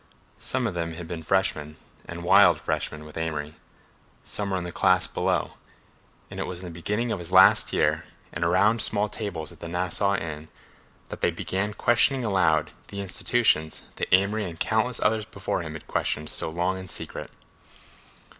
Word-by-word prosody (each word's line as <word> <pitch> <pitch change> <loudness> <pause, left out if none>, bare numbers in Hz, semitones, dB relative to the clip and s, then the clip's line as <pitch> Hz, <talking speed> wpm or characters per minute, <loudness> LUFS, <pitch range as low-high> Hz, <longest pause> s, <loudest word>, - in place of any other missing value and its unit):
Some 125 +2 -2
of 110 - -1
them 85 -1 -3
had 85 -1 -7
been 85 -1 -5
freshmen, 80 -4 0 0.3
and 85 0 -7
wild 85 - +6
freshmen, 75 0 -3
with 75 - -11
Amory; 75 -2 -3 0.7
some 100 -1 -4
were 95 - 0
in 90 - -3
the 90 - -5
class 95 0 +3
below; - - -1 0.8
and - - -7
it - - -2
was 90 - -4
in 90 - -9
the 90 - -7
beginning 105 +8 -2
of 100 - -2
his 85 - -7
last - - +6
year - - +1 0.3
and 85 - -2
around 100 +7 +3
small 105 0 +2
tables 100 -8 -5
at - - -15
the - - -7
Nassau 90 +3 0
Inn 80 -3 -5 0.6
that - - -8
they - - +3
began 100 +2 -3
questioning 120 +3 +3
aloud 95 -7 +2 0.2
the 100 - -7
institutions 95 -4 +1
that - - -3
Amory 100 +1 +3
and 85 -1 -11
countless 115 +3 +1
others 110 0 +2
before 100 -4 -3
him 80 -2 -6
had 80 - -9
questioned 75 0 -2
so - - 0
long 90 +3 -1
in 95 - -9
secret. - - -5
95 Hz, 180 wpm, -26 LUFS, 80-105 Hz, 0.8 s, wild